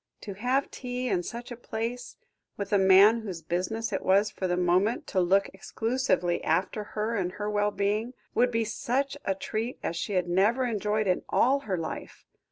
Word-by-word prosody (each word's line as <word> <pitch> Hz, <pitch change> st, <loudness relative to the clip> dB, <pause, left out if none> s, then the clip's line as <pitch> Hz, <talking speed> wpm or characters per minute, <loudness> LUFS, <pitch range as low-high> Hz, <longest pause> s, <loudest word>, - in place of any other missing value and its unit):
To 200 Hz, -, -6 dB
have 250 Hz, +7 st, 0 dB
tea 250 Hz, 0 st, -4 dB
in 185 Hz, -4 st, +1 dB
such 235 Hz, +7 st, -7 dB
a -, -, -4 dB
place, 240 Hz, +1 st, -5 dB, 0.4 s
with 200 Hz, +1 st, -4 dB
a 200 Hz, -, +5 dB
man 195 Hz, +4 st, +6 dB
whose 185 Hz, -7 st, -6 dB
business 210 Hz, +7 st, -2 dB
it 195 Hz, -, -1 dB
was 200 Hz, +3 st, +3 dB
for 185 Hz, -, -3 dB
the 180 Hz, 0 st, 0 dB
moment 180 Hz, +6 st, +2 dB
to 190 Hz, -, +3 dB
look 195 Hz, +3 st, +3 dB
exclusively 190 Hz, -4 st, -1 dB
after 185 Hz, +6 st, 0 dB
her 220 Hz, +2 st, -1 dB
and 180 Hz, -3 st, -1 dB
her 210 Hz, 0 st, -3 dB
well 205 Hz, 0 st, +2 dB
being, 210 Hz, +5 st, -1 dB, 0.2 s
would 245 Hz, +1 st, +3 dB
be 230 Hz, -1 st, 0 dB
such 265 Hz, +5 st, -1 dB
a 195 Hz, -, +1 dB
treat 225 Hz, +5 st, -3 dB
as 170 Hz, -, -2 dB
she 170 Hz, +5 st, -3 dB
had 180 Hz, -2 st, +1 dB
never 205 Hz, +9 st, +2 dB
enjoyed 215 Hz, -2 st, 0 dB
in 185 Hz, -2 st, +1 dB
all 270 Hz, +3 st, +3 dB
her 185 Hz, -, +1 dB
life. 165 Hz, -, -6 dB
210 Hz, 190 wpm, -28 LUFS, 190-235 Hz, 0.4 s, man